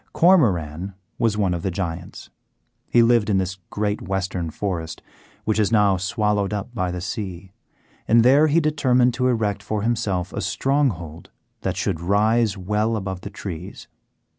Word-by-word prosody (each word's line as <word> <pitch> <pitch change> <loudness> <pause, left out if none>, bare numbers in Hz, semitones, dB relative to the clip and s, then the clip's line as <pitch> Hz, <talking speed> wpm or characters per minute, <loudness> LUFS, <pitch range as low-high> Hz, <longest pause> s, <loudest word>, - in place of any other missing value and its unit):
Cormoran 95 - +2 0.2
was 115 -3 +1
one 95 -4 +1
of 85 - -3
the 95 - -1
Giants; 85 -2 -5 0.6
he 120 - +5
lived 115 -2 +3
in 100 - +3
this 95 0 -2
great 105 0 -2
western 95 -3 -2
forest, 85 -2 -4 0.4
which 110 0 +1
is 105 0 +2
now 105 -3 +4
swallowed 105 +1 0
up 105 +4 -4
by 90 -6 -1
the 90 0 -4
sea, 95 -2 -5 0.6
and 115 0 +5
there 140 +5 +6
he 155 +3 +3
determined 130 -5 +2
to 130 +1 0
erect 110 -5 0
for 105 -1 -3
himself 100 -6 -1
a - - -3
stronghold 110 - -1 0.3
that - - -2
should 80 - -1
rise 105 +3 +2
well 105 +4 0
above 95 -3 -4
the 100 - -7
trees. 90 -1 -8
105 Hz, 160 wpm, -22 LUFS, 90-115 Hz, 0.6 s, there